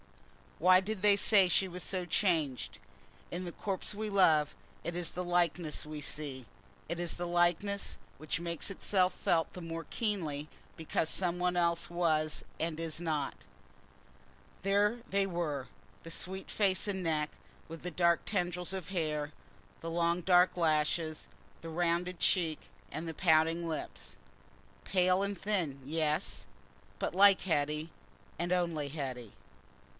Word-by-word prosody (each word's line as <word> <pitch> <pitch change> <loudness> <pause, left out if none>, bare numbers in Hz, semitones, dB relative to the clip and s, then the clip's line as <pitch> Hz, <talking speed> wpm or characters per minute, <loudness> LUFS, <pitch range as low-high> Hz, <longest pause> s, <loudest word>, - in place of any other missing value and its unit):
Why 185 +2 +6
did 200 +1 -4
they 205 -1 +7
say 200 -2 +5
she 190 +2 +3
was 180 0 -7
so 185 -2 -2
changed? 160 -9 0 0.5
In 180 +1 -3
the 175 - -4
corpse 195 +3 -3
we 215 +1 -3
love, 155 -6 +4 0.3
it 170 - -3
is 175 -2 -1
the 180 - -3
likeness 175 -3 0
we 155 -1 -6
see—it 130 -1 -5
is 175 -1 -1
the 175 0 -3
likeness, 175 +4 +1 0.2
which 155 +2 -3
makes 170 +1 -2
itself 190 -1 +1
felt 165 -2 +1
the 180 - -7
more 165 0 -5
keenly 160 -10 -2 0.3
because 160 0 -1
something 180 -1 +1
else 170 -1 +1
was 160 -3 +1 0.2
and 165 -1 -2
is 165 -1 -3
not. 155 -5 -2 1.2
There 205 +4 +3
they 200 0 +2
were—the 165 -2 -5
sweet 190 +3 -2
face 195 -1 +1
and 190 -2 -2
neck, 155 -2 0 0.4
with 165 0 -8
the 180 - -4
dark 170 +1 +3
tendrils 180 -2 -1
of 185 -3 -5
hair, 155 -5 -1 0.5
the 165 - -4
long 170 +1 +1
dark 180 0 +4
lashes, 155 -1 +1 0.3
the 165 - -7
rounded 175 +2 0
cheek 165 -5 +1 0.2
and 165 +2 -4
the 160 - -5
pouting 165 0 +3
lips—pale 180 +3 -2
and 200 0 -2
thin, 170 -8 -1
yes, 155 +1 -1 0.5
but - - -2
like 200 0 +7
Hetty, 150 -2 0 0.5
and 175 +2 -2
only 170 -5 0
Hetty. 130 -7 -5
170 Hz, 140 wpm, -32 LUFS, 155-185 Hz, 1.2 s, they